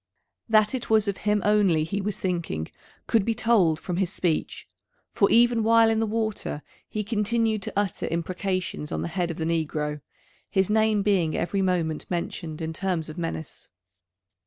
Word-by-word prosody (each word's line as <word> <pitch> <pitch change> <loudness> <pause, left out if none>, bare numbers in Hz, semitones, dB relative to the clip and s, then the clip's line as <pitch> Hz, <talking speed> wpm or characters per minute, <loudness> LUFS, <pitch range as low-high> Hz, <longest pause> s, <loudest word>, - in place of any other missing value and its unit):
That 215 0 +4
it 255 -2 -4
was 220 -1 +3
of 200 -1 -1
him 210 -1 +2
only 200 -7 +3
he 200 +6 -2
was 205 +1 -3
thinking 170 - -2 0.4
could 225 -3 +2
be 225 +2 0
told 210 -9 +3
from 180 -2 -4
his 190 -1 0
speech, 170 -5 -2 0.5
for 200 - +3
even 235 0 +4
while 225 0 +5
in 220 - +1
the 225 - +1
water 215 -8 -2 0.3
he 215 - -2
continued 220 0 0
to - - -5
utter 200 -3 -1
imprecations 180 -1 -3
on - - -2
the - - -2
head 175 0 -1
of 165 - -5
the 160 - -2
negro, 150 -2 -1 0.5
his 190 +1 +1
name 215 -1 +3
being 185 -6 +1
every 195 +3 -1
moment 170 -5 -1
mentioned 170 -2 -4
in 160 0 -3
terms 175 -3 -2
of 155 - -7
menace. 165 -2 -6
195 Hz, 175 wpm, -26 LUFS, 165-215 Hz, 0.5 s, while